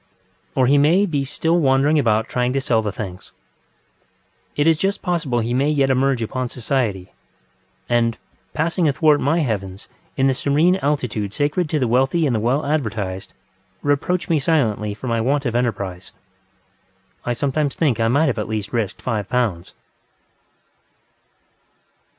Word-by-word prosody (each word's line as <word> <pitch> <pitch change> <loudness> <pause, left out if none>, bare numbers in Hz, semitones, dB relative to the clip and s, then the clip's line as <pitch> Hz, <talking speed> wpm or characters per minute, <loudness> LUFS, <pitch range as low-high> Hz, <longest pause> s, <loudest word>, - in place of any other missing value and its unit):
Or 130 - +3
he 140 +3 +4
may 170 +8 +4
be 145 -7 -1
still 165 +5 0
wandering 140 +1 +3
about 110 -4 +1
trying 125 0 -1
to 135 - +1
sell 120 -4 +1
the 105 -2 -3
things. 95 -3 -8 1.2
It 145 - +1
is 165 0 +5
just 195 +2 -1
possible 160 -10 0
he 115 +2 -2
may 135 +4 +2
yet 140 -3 +2
emerge 130 -2 +1
upon 125 +2 -3
society, 115 -7 -2 0.8
and, 115 -1 +1 0.4
passing 165 +2 +1
athwart 150 0 +3
my 160 +5 +2
heavens 100 -7 -3 0.3
in 135 - +2
the 135 - +3
serene 150 +8 +2
altitude 125 - -2
sacred 150 +5 0
to 155 - 0
the 130 -4 +1
wealthy 135 +7 +2
and 130 -5 +1
the - - +1
well 125 +7 0
advertised, 110 -10 -3 0.5
reproach 145 +5 0
me 160 -2 +2
silently 110 -9 0
for 120 - -10
my 115 -2 0
want 140 +4 0
of 120 -2 -1
enterprise. 100 -7 -2 1.1
I 120 - -1
sometimes 140 +3 -1
think 135 -9 +1
I 115 - +2
might 145 +7 +3
at 105 -1 -4
least 105 -2 -3
have - - -26
risked 115 -5 -2
five 105 -5 -2
pounds. 115 -9 -1
130 Hz, 155 wpm, -21 LUFS, 115-150 Hz, 1.2 s, is